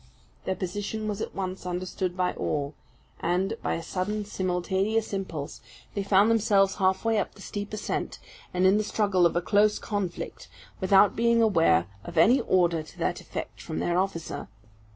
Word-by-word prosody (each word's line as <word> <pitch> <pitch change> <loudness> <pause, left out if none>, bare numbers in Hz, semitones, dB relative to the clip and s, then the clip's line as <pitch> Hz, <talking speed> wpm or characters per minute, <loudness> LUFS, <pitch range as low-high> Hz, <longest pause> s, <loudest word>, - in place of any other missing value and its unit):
Their 190 - 0
position 205 +4 -4
was 210 0 -3
at - - -5
once 185 -1 -4
understood 180 0 -3
by 180 -1 +1
all; 145 0 -2 0.5
and, 185 +4 0
by - - -1
a 165 - -5
sudden, 205 +4 -2
simultaneous 190 +3 -1
impulse, 155 - -4 0.3
they 200 - -1
found 200 +2 +4
themselves 200 -3 +3
halfway 195 +3 +2
up 200 - -3
the 200 - -14
steep 205 0 -5
ascent, 215 -1 -3 0.3
and 180 +1 +1
in 195 +3 +5
the - - +1
struggle 200 -4 +3
of 170 - -5
a 175 - +2
close 210 +2 +3
conflict, 200 -5 -4 0.3
without 195 +1 +5
being 235 0 +3
aware 165 - +4 0.2
of 170 - -8
any 235 +12 +6
order 170 -3 +2
to 155 - -14
that - - -1
effect - - -7
from - - -5
their 175 +1 +1
officer. 185 -4 -3
190 Hz, 170 wpm, -27 LUFS, 180-210 Hz, 0.5 s, any